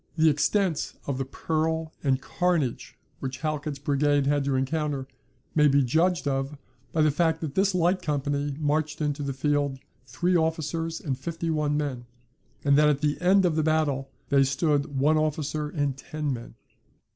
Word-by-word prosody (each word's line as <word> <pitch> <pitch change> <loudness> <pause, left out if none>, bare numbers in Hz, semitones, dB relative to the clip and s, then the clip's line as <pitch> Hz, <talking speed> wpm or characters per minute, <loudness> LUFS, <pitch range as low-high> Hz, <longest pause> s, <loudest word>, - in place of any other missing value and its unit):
The 160 0 +5
extent 175 +3 0
of 135 -2 -2
the 135 - -1
peril 160 +3 -2
and 135 -2 +3
the - - -22
carnage 170 -8 -1 0.2
which 130 0 -5
Halkett's 150 -2 -2
brigade 145 0 +1
had 145 0 +2
to 140 -1 +1
encounter, 140 0 -1 0.5
may 150 -1 +5
be 140 0 +4
judged 160 +3 +1
of 135 +1 -1 0.3
by 160 - +2
the 155 - +4
fact 160 +2 +1
that 155 -4 -4
this 195 +2 +2
light 180 +2 +2
company 145 -2 -1
marched 150 0 0
into 150 -1 -1
the 140 -1 -2
field 145 0 0 0.3
three 175 +9 0
officers 165 0 -1
and 140 -5 -2
fifty 165 0 -3
one 150 -1 0
men, 130 -5 -3 0.6
and 140 0 +4
that 150 0 +5
at 145 -1 +1
the 150 +1 0
end 190 +1 +4
of 170 -3 +2
the 155 - +2
battle 150 -4 +1 0.2
they 140 -1 +5
stood 140 +1 0
one 150 +4 +3
officer 150 -1 -1
and 145 -4 -1
ten 150 -1 -3
men. 120 -1 -8
150 Hz, 175 wpm, -26 LUFS, 140-160 Hz, 0.6 s, The